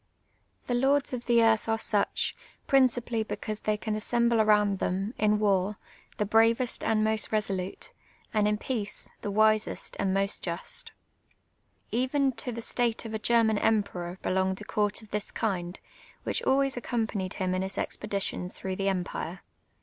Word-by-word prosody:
llie 245 -1 +1
lords 275 0 +2
of 245 -1 -5
the 235 -1 +5
earth 225 0 +3
are 225 - +2
such, 210 -2 0 0.3
principally 245 -4 +2
because 215 0 -4
they 215 -1 0
can 210 +2 -3
a.ssemble 235 +1 +2
aroiuid 210 -2 +3
them, 195 +5 -1
in 210 0 +3
war, 200 -1 +1 0.4
the 210 - 0
bravest 225 +3 +2
and 215 -1 +2
most 220 -1 +1
reso 210 -3 0
lute, 190 - -6 0.4
and 210 -1 +3
in 210 0 +1
peace, 215 -3 -3
thi' - - -3
wisest 215 +1 +2
and 195 -1 +1
most 195 +1 +1
just, 170 -1 -3 1.0
l^ven 260 +2 +1
to 230 +2 -2
the 235 0 -5
stJite 235 -1 +1
of 225 - -6
a 220 - -2
German 225 -2 +3
emperor 185 -5 0
belonged 190 0 0
a - - -8
court 210 +1 0
of 215 - -17
this 210 0 -2
kind, 185 -5 -2 0.4
which - - -1
alw;;ys 275 0 +3
accompanied 220 -6 -2
him 185 -1 -1
in 185 - 0
his 190 0 -3
expeditions 195 -3 -2
through 190 -1 -4
the 195 - -1
emj)ire. 180 -2 -3
215 Hz, 165 wpm, -28 LUFS, 195-230 Hz, 1.0 s, the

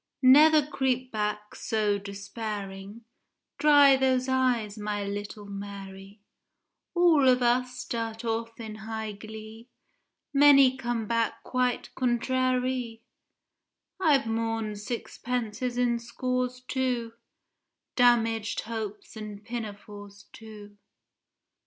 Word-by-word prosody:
Never 300 +3 +7
creep 260 -3 -1
back 210 -1 -3
so 210 -2 0
despairing, 200 +1 -7 0.5
Dry 285 -2 +7
those 260 -1 +1
eyes, 250 -5 +1
my 210 -1 -3
little 205 +1 -6
Mary, 200 0 -9 0.7
All 335 -6 +5
of 250 -1 +4
us 250 +1 +1
start 230 -2 -4
off 230 0 -3
in 220 -2 -6
high 220 0 -5
glee, 220 +3 -10 0.6
Many 275 -2 +7
come 240 -4 -3
back 230 +1 -1
quite 250 -1 -1
"contrairy"— 255 -1 0 1.0
I've 295 -8 +3
mourn'd 225 -2 -2
sixpences 240 +1 -4
in 240 -1 +1
scores 250 +1 -3
too, 250 -3 -2 0.8
Damag'd 230 -3 +2
hopes 220 -2 -6
and 210 -1 -8
pinafores 205 -3 -8
too. 210 -2 -12
230 Hz, 95 wpm, -27 LUFS, 210-255 Hz, 1.0 s, Never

